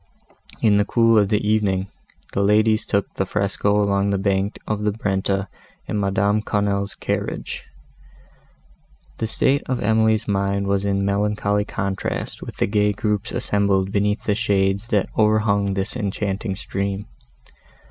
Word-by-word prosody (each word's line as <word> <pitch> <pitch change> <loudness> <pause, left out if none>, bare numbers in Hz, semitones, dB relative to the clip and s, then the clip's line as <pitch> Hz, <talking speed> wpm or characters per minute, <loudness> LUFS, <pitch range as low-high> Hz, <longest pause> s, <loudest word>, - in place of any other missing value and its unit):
In 105 -2 +5
the 105 - +4
cool 115 0 +3
of 100 -2 +2
the 105 -1 +1
evening, 100 -3 +1 0.5
the 100 - +1
ladies 110 +2 +3
took 100 0 0
the - - -1
fresco 100 +1 0
along 100 -1 +1
the 100 - +1
bank 100 0 0
of 105 -1 -2
the 105 0 +1
Brenta 95 -2 -1 0.4
in 105 - -2
Madame 100 +1 +1
Quesnel's 100 -1 -1
carriage. - - -3 1.5
The 110 - -1
state 135 +5 +1
of 130 - -1
Emily's 110 0 +2
mind 100 0 0
was 100 0 0
in 100 -1 0
melancholy 105 0 0
contrast 100 -3 -3
with - - -8
the - - +2
gay 105 0 +2
groups 105 +1 -2
assembled 100 -2 +1
beneath 105 +1 0
the 105 - +1
shades 100 -1 +1
that 105 -4 +1
overhung 105 -2 +2
this 95 +4 -2
enchanting 100 -2 -2
stream. 100 +1 -3
100 Hz, 145 wpm, -22 LUFS, 100-105 Hz, 1.5 s, In